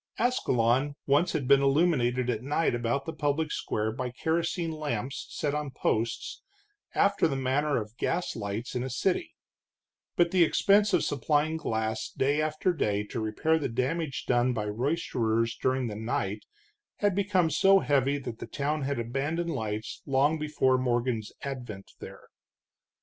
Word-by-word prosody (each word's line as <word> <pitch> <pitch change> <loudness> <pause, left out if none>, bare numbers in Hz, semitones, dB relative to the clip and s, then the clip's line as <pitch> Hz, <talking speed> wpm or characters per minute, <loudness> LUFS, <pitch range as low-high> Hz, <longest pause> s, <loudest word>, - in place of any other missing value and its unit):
Ascalon 135 - +1
once 145 +6 +3
had 135 -4 -1
been 140 0 +6
illuminated 135 -4 +2
at 115 -3 -1
night 145 +4 +1
about 120 +3 -1
the 160 - -4
public 150 +1 -1
square 110 +1 -1
by 125 +2 -3
kerosene 165 +5 -1
lamps 140 -5 -4
set 145 -1 -2
on 150 -1 -2
posts, 115 -3 -2 0.5
after 200 -3 +3
the 140 - -2
manner 135 +2 +1
of 105 +1 -8
gas 175 +1 -1
lights 105 +4 -4
in 125 - -1
a 130 - -3
city, 180 - -1 0.8
but 170 -1 +3
the 185 -2 +5
expense 200 +5 +4
of - - +3
supplying 150 +3 +1
glass 110 -8 -2
day 145 +3 +1
after 155 +4 0
day 105 -10 0
to 115 +3 -5
repair 115 +9 +1
the 145 - -2
damage 135 +5 -2
done 125 0 +2
by 105 -3 -2
roysterers 115 -1 0
during 130 0 0
the 110 -3 -4
night 105 -2 -3 0.5
had 205 -2 +1
become 190 -4 +2
so 195 +6 +5
heavy 140 -5 +2
that 125 -5 -7
the - - -6
town 150 +2 -2
had 140 +1 -1
abandoned 145 +9 -2
lights 110 -5 -4
long 140 +3 +2
before 140 -4 +2
Morgan's 120 -3 -1
advent 125 -8 -6
there. - - -11
135 Hz, 155 wpm, -28 LUFS, 120-155 Hz, 0.8 s, been